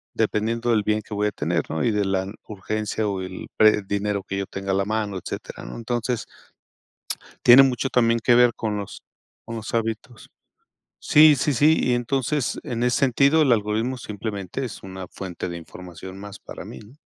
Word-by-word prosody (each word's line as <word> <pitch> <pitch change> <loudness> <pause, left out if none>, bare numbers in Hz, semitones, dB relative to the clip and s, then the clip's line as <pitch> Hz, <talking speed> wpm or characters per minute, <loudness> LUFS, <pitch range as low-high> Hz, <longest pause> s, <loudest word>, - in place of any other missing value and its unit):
dependiendo 115 +2 0
del 110 - +3
bien 105 +1 +1
que 110 - -9
voy 105 0 +1
a - - -1
tener, 85 -1 -2
¿no? 80 - -2
Y 120 - +2
de 105 -1 0
la 95 -1 0 0.2
urgencia 105 +1 -3
o 95 -2 -2
el 95 0 -7
pre 110 -1 +5
dinero 100 -1 -1
que 100 - -3
yo 100 - -2
tenga 95 0 -4
a - - +2
la 100 0 +1
mano, 105 -2 -2
etcétera, - - -7
¿no? - - -8
Entonces. 120 0 -2 1.2
Tiene 125 +3 +10
mucho 135 0 +1
también 115 -1 +3
que 115 +1 +3
ver 120 -1 +5
con 110 -2 -2
los 100 -1 -7 0.4
con 115 - -7
los 110 -1 -6
hábitos. 115 +1 -3 0.7
Sí, 150 -1 +6
sí, 145 - +1
sí, 150 +5 +4
y 125 - +1
entonces, 130 +2 0
en 120 0 -4
ese 125 +3 +2
sentido, 140 +4 +4
el 135 -5 +4
algoritmo 110 +4 0
simplemente 105 +1 -5
es 120 - -7
una 95 -1 -7
fuente 90 -2 -6
de 85 - -5
información 90 +2 -10
más 100 -1 -9
para - - -9
mí, - - -9
¿no? 115 +7 -16
110 Hz, 195 wpm, -23 LUFS, 100-120 Hz, 1.2 s, Tiene